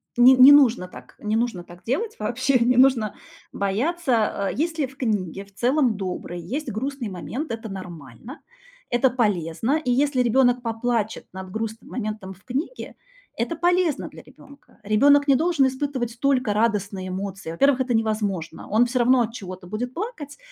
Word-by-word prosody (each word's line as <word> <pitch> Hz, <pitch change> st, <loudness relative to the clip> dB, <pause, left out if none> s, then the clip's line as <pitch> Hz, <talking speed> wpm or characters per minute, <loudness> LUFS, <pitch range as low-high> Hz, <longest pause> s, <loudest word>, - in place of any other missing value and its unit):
н 255 Hz, +1 st, +7 dB
не 275 Hz, -, +11 dB
нужно 250 Hz, -10 st, +5 dB
так, -, -, -14 dB
не 215 Hz, +1 st, -2 dB
нужно 225 Hz, -6 st, -1 dB
так 175 Hz, 0 st, -15 dB
делать 415 Hz, -, -2 dB
вообще, 255 Hz, +4 st, +1 dB
не 240 Hz, +1 st, +2 dB
нужно 250 Hz, -5 st, +4 dB, 0.4 s
бояться, 225 Hz, -, 0 dB
а. -, -, 0 dB
Если 320 Hz, 0 st, -1 dB
в 265 Hz, +1 st, -13 dB
книге, 200 Hz, -, -2 dB
в 200 Hz, -, -24 dB
целом- 250 Hz, -1 st, +1 dB
доброй, 180 Hz, -2 st, -5 dB
есть 280 Hz, -, -4 dB
грустный 255 Hz, +1 st, -4 dB
момент, 240 Hz, -, -5 dB
это 225 Hz, 0 st, -5 dB
нормально, 180 Hz, -, -9 dB, 0.5 s
это 245 Hz, +2 st, +3 dB
полезно, 215 Hz, -, 0 dB
и 250 Hz, -, 0 dB
если 270 Hz, +1 st, +2 dB
ребёнок 245 Hz, +1 st, +3 dB
поплачет 230 Hz, -1 st, -2 dB
над 190 Hz, 0 st, -8 dB
грустным 220 Hz, +1 st, -5 dB
моментом 215 Hz, -5 st, -5 dB
в 190 Hz, -, -23 dB
книге- 280 Hz, -, -5 dB, 0.4 s
это 235 Hz, +8 st, -2 dB
полезно 350 Hz, -1 st, +1 dB
для -, -, -13 dB
ребёнка. 280 Hz, 0 st, -19 dB
Ребёнок 285 Hz, +8 st, +4 dB
не 275 Hz, -, +5 dB
должен 320 Hz, -1 st, +2 dB
испытывать 260 Hz, -3 st, -3 dB
только 255 Hz, -5 st, +1 dB
радостные 205 Hz, -3 st, -1 dB
эмоции. 190 Hz, -1 st, -5 dB
Во-первых, 260 Hz, +10 st, +2 dB
это 245 Hz, -2 st, 0 dB
невозможно. 210 Hz, -6 st, -2 dB
Он 220 Hz, +4 st, +4 dB
всё 245 Hz, +1 st, -1 dB
равно 250 Hz, +1 st, +4 dB
от 230 Hz, -1 st, -2 dB
чего-то 185 Hz, -5 st, -8 dB
будет 235 Hz, +6 st, -4 dB
плакать, 335 Hz, -, -6 dB
240 Hz, 165 wpm, -23 LUFS, 200-270 Hz, 0.5 s, не